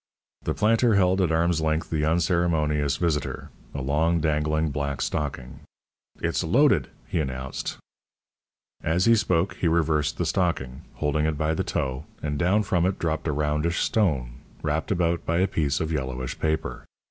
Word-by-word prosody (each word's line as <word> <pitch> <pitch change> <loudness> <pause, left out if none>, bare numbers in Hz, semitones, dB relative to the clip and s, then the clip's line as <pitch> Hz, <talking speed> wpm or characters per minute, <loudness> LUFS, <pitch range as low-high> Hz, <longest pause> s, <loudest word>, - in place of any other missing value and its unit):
The - - -2
planter 115 +1 +3
held 95 0 +3
at 85 -3 +2
arm's 85 0 +2
length 80 +1 -1
the 75 -2 +1
unceremonious 80 -4 +1
visitor 80 -5 -2 0.2
a 70 - -3
long 80 +5 +2
dangling 75 0 +1
black 70 -1 -2
stocking. 65 -4 -3 0.6
"It's - - -1
loaded," - - +3 0.2
he - - -1
announced. 65 -3 -4 1.0
As 85 +3 +1
he 115 - +6
spoke, 95 -3 +1
he 85 - 0
reversed 80 -2 +1
the 85 - 0
stocking, 80 -8 -1
holding 75 +1 0
it 80 -2 -1
by 80 +1 0
the - - -1
toe, 65 -1 -2
and 75 -1 -3
down 95 +6 +3
from 90 -3 +1
it 95 - -1
dropped 80 -2 -2
a - - +1
roundish 75 +3 0
stone, 70 - 0 0.3
wrapped 75 +4 -1
about 85 -3 +1
by 85 - 0
a 95 +2 +3
piece 75 -5 0
of 80 0 -2
yellowish 65 -4 -3
paper. 80 0 -2
80 Hz, 160 wpm, -25 LUFS, 75-85 Hz, 1.0 s, he